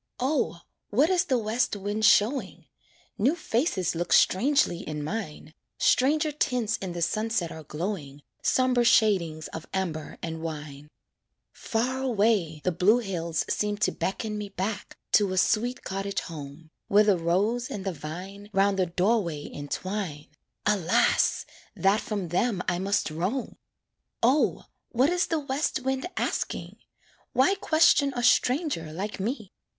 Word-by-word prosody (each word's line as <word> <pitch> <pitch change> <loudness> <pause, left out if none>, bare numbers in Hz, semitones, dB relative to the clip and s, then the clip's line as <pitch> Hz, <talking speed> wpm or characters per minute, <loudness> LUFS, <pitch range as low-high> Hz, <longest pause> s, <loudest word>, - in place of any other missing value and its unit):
O! 260 - 0 0.3
what 280 - +3
is 360 -2 +2
the 260 - +1
west 225 +1 0
wind 205 +2 -1
showing? 230 +6 +3 0.5
New 265 +10 +3
faces 235 - 0
look 175 +1 -3
strangely 245 - +4
in 150 -5 -5
mine, 155 -4 -5 0.2
Stranger 300 +4 +3
tints 250 -7 0
in 185 -3 -5
the 170 -1 -2
sunset 215 -3 -1
are 160 - -8
glowing, 150 -3 -5 0.2
Somber 255 -2 +2
shadings 180 -9 +3
of 160 - -8
amber 165 -5 -3
and 160 -1 -4
wine. 150 -3 -6 0.7
Far 255 +4 -2
away 205 - +1
the 185 - +1
blue 185 +7 +4
hills 170 -7 -2
seem 210 0 -1
to 215 - +1
beckon 210 +2 -3
Me 205 -1 -5
back 200 +2 -4
to 200 -3 +4
a - - -3
sweet 240 +6 +1
cottage 195 +1 -3
home, 155 0 -9 0.2
Where 205 +1 +5
the 205 -2 +4
rose 205 +9 0
and 195 -2 -5
the 190 - -1
vine 185 +7 -8
'Round 195 0 +2
the 185 - +2
door 195 +7 +2
way 155 -4 -5
entwine 155 +1 -4 0.4
Alas! 195 -6 +2 0.3
that 195 +3 +2
from 200 -5 -4
them 185 +2 0
I 175 - 0
must 195 -3 0
roam! 185 - -2 0.7
O! 260 +6 +3 0.3
what 260 +6 +2
is 355 +1 +1
the 325 - 0
west 280 -1 -1
wind 265 +4 -1
asking? - - -2 0.6
Why 265 +9 +4
question 315 -6 +3
a 245 - -2
stranger 250 - +2
like 195 +6 -5
me? 215 -1 -3
205 Hz, 145 wpm, -27 LUFS, 170-245 Hz, 0.7 s, Where